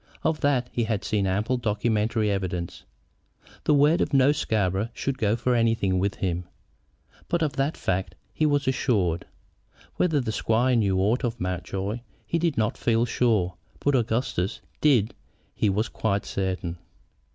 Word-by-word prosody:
Of 160 -1 +1
that 135 -4 +2
he 120 - 0
had 110 -2 -1
seen 100 -3 0
ample 105 +7 0
documentary 110 -1 0
evidence. 90 -3 -3 0.8
The 150 - +4
word 145 +4 +4
of 140 - 0
no 135 +1 +6
Scarborough 105 -7 0
should 135 -1 -2
go 105 -1 +2
for 125 +1 0
anything 115 -6 +2
with 100 +1 0
him; 90 -2 -2 0.8
but 170 -1 +1
of 150 - 0
that 140 +3 0
fact 95 0 -2 0.2
he 155 - +2
was 145 -2 +1
assured. 100 -10 +1 0.7
Whether 160 -5 +2
the 120 -4 -2
squire 120 +4 +2
knew 100 -5 +2
aught 110 +8 +1
of 120 -1 -2
Mountjoy 95 +4 -3 0.3
he 170 - 0
did 165 -4 0
not 110 -1 0
feel 115 0 +2
sure, 110 -7 +1 0.3
but 145 - +2
that 135 - +3
Augustus 110 -4 -1 0.2
did 125 -8 +3 0.4
he 105 - +1
was 105 +4 0
quite 105 -2 -1
certain. 90 -3 -3
110 Hz, 160 wpm, -26 LUFS, 95-130 Hz, 0.8 s, no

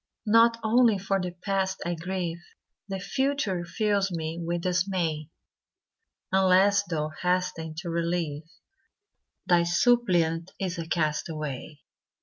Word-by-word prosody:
Not 230 +2 +5
only 225 -1 +4
for 195 0 -1
the 180 - -2
past 190 +1 -2
I 175 - -1
grieve, 175 0 -4 0.5
The 195 -1 -3
future 215 -3 -1
fills 200 +2 0
me 165 0 -4
with 170 +1 -2
dismay; 180 -4 -1 1.0
Unless 190 +1 +4
Thou 155 -3 -2
hasten 180 -3 -1
to 175 - -6
relieve, 165 -2 -2 1.0
Thy 175 -1 +4
suppliant 175 -4 +2
is 180 -3 -3
a 165 - -5
castaway. 155 -2 -3
180 Hz, 115 wpm, -27 LUFS, 165-195 Hz, 1.0 s, Not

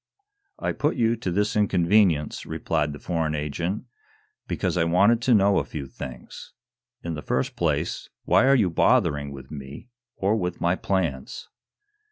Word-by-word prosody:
"I - - -2
put 150 - 0
you 115 -2 +2
to 110 -4 -3
this 105 +4 0
inconvenience," 95 -5 +2
replied 75 -3 -1
the 75 - -7
foreign 80 -1 -2
agent, 85 - -3 0.6
"because - - -1
I 90 - +2
wanted 100 +8 +3
to 120 0 +4
know 100 -1 +4
a - - -1
few 75 -3 -6
things. 65 -2 -9 0.5
In 85 - -3
the 75 - -5
first 65 - -1
place, - - -1 0.2
why 130 - +4
are 135 - +6
you 100 -9 +2
bothering 80 - +2
with 65 -1 -10
me, 70 - -9 0.3
or 100 +3 +1
with 90 -4 -3
my 85 +1 +2
plans?" 85 -10 -3
85 Hz, 160 wpm, -25 LUFS, 75-105 Hz, 0.6 s, are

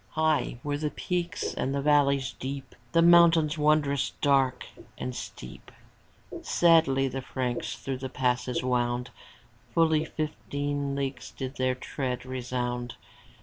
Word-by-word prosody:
High 155 -5 +1
were 145 0 -2
the 150 0 -1
peaks 175 +2 -3
and 135 +1 -2
the 140 - 0
valleys 140 -3 +3
deep. 135 +1 -6 0.2
The 165 - +4
mountains 170 -2 +6
wondrous 150 -2 +2
dark 135 -3 +2 0.3
and 125 -1 -4
steep; 60 - -9 0.7
Sadly 160 -6 +4
the 135 +1 -4
Franks 125 -2 -3
through 135 -1 -4
the 130 0 -5
passes 125 -1 0
wound; 125 -1 0 0.6
Fully 160 -2 +3
fifteen 145 -2 -3
leagues 135 -1 -3
did 130 0 -6
their 130 0 +1
tread 125 -1 -4
resound. 125 -1 -3
140 Hz, 125 wpm, -28 LUFS, 130-150 Hz, 0.7 s, mountains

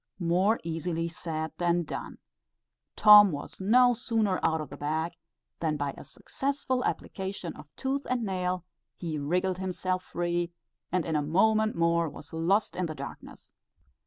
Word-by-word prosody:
More 185 +5 +2
easily 165 0 -2
said 160 -1 -4
than 175 0 +2
done. 155 - -6 0.8
Tom 210 -2 +9
was 145 +5 -6
no 245 +5 +5
sooner 225 -5 0
out 160 0 +2
of 155 - -6
the - - -6
bag, 160 +3 -2 0.5
than 155 -2 0
by 145 -1 -2
a - - -10
successful 270 -2 -2
application 190 -3 -4
of 150 -1 -12
tooth 275 +1 -2
and 250 -2 0
nail, 180 -2 -2 0.3
he 160 -4 -3
wriggled 180 +5 0
himself 185 0 -2
free, 175 -1 -2 0.4
and 180 -2 +1
in 160 - -1
a 150 - +2
moment 215 +8 +2
more 170 -1 +2
was 145 +2 -12
lost 180 +7 +1
in 180 -1 -1
the 155 - -6
darkness. 140 -1 -10
175 Hz, 155 wpm, -29 LUFS, 160-200 Hz, 0.8 s, Tom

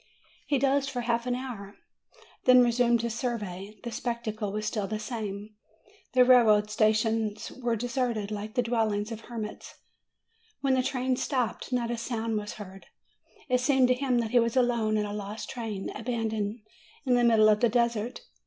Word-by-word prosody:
He 285 - +2
dozed 275 +1 +2
for 245 - -3
half 235 0 -1
an 245 - +1
hour; 230 -6 -7 0.7
then 255 -1 +7
resumed 240 -1 +2
his 235 -1 -2
survey: 210 -5 -4
the 235 - -5
spectacle 225 -4 -3
was 215 +1 -3
still 210 -2 -2
the 215 +2 -3
same. 210 -2 -5 0.6
The 255 -1 +6
rail 250 -2 +7
way 210 -1 +5
stations 215 0 +1
were 240 -2 -2
deserted, 240 -3 -2
like 210 +2 -5
the 245 - +2
dwellings 220 -2 0
of 225 -1 -6
hermits. 225 -3 -7 0.9
When 270 -1 +2
the 260 - +3
train 255 0 -1
stopped 250 -3 -2
not 240 -2 0
a 240 - -2
sound 230 -1 -2
was 210 0 -6
heard; 195 -2 -11 0.6
it 250 -2 +2
seemed 265 -1 +3
to - - +6
him 250 -1 0
that 225 -1 -4
he 245 - +5
was 230 +2 +1
alone 235 -4 +2
in 210 - 0
a 205 - -5
lost 210 +1 -6
train, 220 -5 -4
abandoned 220 -2 -3 0.4
in 255 - +2
the 245 0 +4
middle 220 -2 +6
of 210 +2 +2
a 240 - +5
desert. 235 0 0
230 Hz, 180 wpm, -28 LUFS, 215-245 Hz, 0.9 s, then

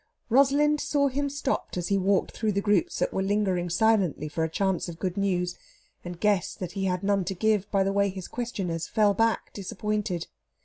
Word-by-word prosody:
Rosalind 280 +4 +4
saw 280 -1 +1
him 280 +2 -1
stopped 280 -7 -2
as 175 -1 -2
he 200 - +3
walked 190 0 +1
through 215 -2 -1
the 200 - +1
groups 205 -4 +1
that - - 0
were 190 - 0
lingering 190 -3 0
silently 185 -5 +2
for 155 +2 -2
a 160 - 0
chance 190 +1 -1
of 165 - -8
good 185 0 -3
news; 180 -3 -1 0.4
and 175 -1 -7
guessed 205 -3 +1
that 180 -2 -4
he 195 -1 -3
had 180 0 -1
none 200 -1 +2
to 195 - -3
give, 210 0 +1
by 195 -2 +2
the 195 +1 0
way 200 0 +2
his 190 -1 -7
questioners 190 -9 -3
fell 210 -2 +3
back 225 +2 0
disappointed. 200 -2 -3
195 Hz, 205 wpm, -27 LUFS, 180-215 Hz, 0.4 s, Rosalind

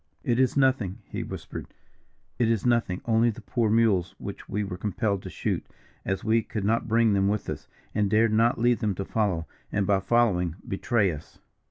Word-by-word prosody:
"It 120 0 +1
is 130 +1 +2
nothing," 130 -9 +2
he - - -5
whispered; - - -7 0.7
"it 120 -2 +3
is 115 -2 0
nothing 115 -7 +1
only 115 0 +3
the 110 - -5
poor 115 -3 0
mules 105 -5 +2
which - - -8
we 105 +1 -1
were 95 -2 -4
compelled 100 +1 -1
to - - -7
shoot, - - -2 0.4
as 95 0 -2
we 115 +1 +3
could 105 -1 -5
not 115 +3 +1
bring 115 -1 +3
them 100 0 +2
with 105 +1 -1
us, - - -5 0.3
and 105 -1 +1
dared 110 +1 +3
not 115 +2 +3
leave 120 -1 +2
them 105 -3 0
to 95 - -4
follow, 95 -7 0 0.3
and, 100 -1 +1
by 100 0 +3
following, 95 -6 +2
betray 105 -1 +1
us." 75 0 -10
110 Hz, 195 wpm, -26 LUFS, 95-115 Hz, 0.7 s, it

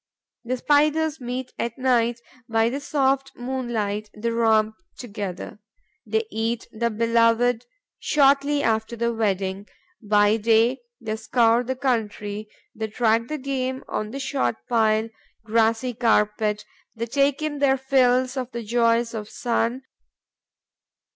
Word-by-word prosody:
The 255 +2 -2
Spiders 300 +2 +2
meet 250 +1 -5
at 235 0 -3
night, 240 -2 +1 0.3
by 225 0 +2
the 270 +4 -3
soft 270 -1 0
moonlight: 235 -5 -3
they 230 +2 -1
romp 220 -2 +2 0.2
together, 205 -4 -6 0.5
they 445 0 +1
eat 225 +1 -2
the 235 +1 -1
beloved 230 +1 +2 0.3
shortly 285 0 +3
after 220 +1 0
the 235 0 0
wedding; 195 -2 -1 0.3
by 210 0 +3
day, 225 +4 +3 0.2
they 220 -2 -3
scour 230 +1 +3
the 260 +2 -3
country, 215 -5 -2 0.2
they 220 0 -4
track 225 +1 +1
the 305 - -3
game 260 -1 -3
on 215 - -3
the 270 +5 -6
short 125 - -1
pile, 220 -1 +2 0.4
grassy 230 +2 +1
carpet, 210 -2 +1 0.3
they 230 +1 -3
take 275 +3 +1
their 285 -3 +1
fill 260 -1 +3
of 255 -2 -3
the 235 -1 -4
joys 230 +1 +2
of 215 -2 -4
the - - -16
sun. 240 +1 -1
235 Hz, 130 wpm, -24 LUFS, 220-260 Hz, 0.5 s, shortly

